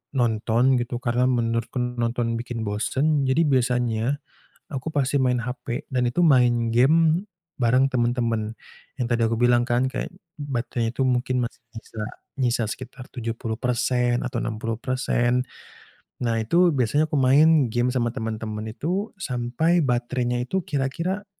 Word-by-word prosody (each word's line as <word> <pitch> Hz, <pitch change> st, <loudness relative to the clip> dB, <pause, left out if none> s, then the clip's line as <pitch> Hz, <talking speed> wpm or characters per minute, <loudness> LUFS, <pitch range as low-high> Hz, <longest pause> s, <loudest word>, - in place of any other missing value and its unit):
nonton 120 Hz, +1 st, +2 dB
gitu, 120 Hz, 0 st, -4 dB
karena 120 Hz, +1 st, +1 dB
menurutku 115 Hz, 0 st, 0 dB
nonton 120 Hz, -1 st, -1 dB
bikin 120 Hz, -1 st, -5 dB
bosen. 135 Hz, +8 st, 0 dB
Jadi 130 Hz, +5 st, +3 dB
biasanya 125 Hz, -2 st, +1 dB, 0.5 s
aku 140 Hz, +2 st, -4 dB
pasti 140 Hz, -1 st, +1 dB
main 125 Hz, -2 st, +2 dB
HP 125 Hz, +2 st, -5 dB
dan 125 Hz, -2 st, +1 dB
itu 120 Hz, +9 st, +1 dB
main 120 Hz, -6 st, +4 dB
gim 160 Hz, -, +4 dB, 0.4 s
bareng 130 Hz, +3 st, +3 dB
temen-temen, 120 Hz, -3 st, 0 dB, 0.4 s
yang 125 Hz, -, -1 dB
tadi 120 Hz, 0 st, +1 dB
aku 115 Hz, +1 st, 0 dB
bilang 120 Hz, +1 st, +3 dB
kan, 120 Hz, +1 st, +2 dB
kayak -, -, -3 dB, 0.3 s
baterainya 120 Hz, -4 st, -2 dB
itu 135 Hz, -, +1 dB
mungkin 125 Hz, 0 st, +1 dB
masih 120 Hz, -, -7 dB, 0.2 s
nyisa 110 Hz, -1 st, -7 dB, 0.4 s
nyisa 120 Hz, -2 st, +1 dB
sekitar 125 Hz, +3 st, -7 dB
70% 120 Hz, +1 st, -1 dB
atau 125 Hz, -2 st, -2 dB
60%. 120 Hz, +2 st, -1 dB, 0.8 s
Nah, 115 Hz, -2 st, 0 dB
itu 170 Hz, +11 st, +3 dB
biasanya 145 Hz, +2 st, +1 dB
aku 150 Hz, -, 0 dB
main 140 Hz, -1 st, +4 dB
gim 120 Hz, +1 st, +2 dB
sama 120 Hz, -2 st, 0 dB
temen-temen 110 Hz, -2 st, -4 dB
itu, 180 Hz, -, -2 dB
sampai 140 Hz, +3 st, 0 dB
baterainya 125 Hz, -2 st, 0 dB
itu 190 Hz, +9 st, -1 dB
kira-kira 165 Hz, +8 st, -2 dB
125 Hz, 135 wpm, -24 LUFS, 120-135 Hz, 0.8 s, main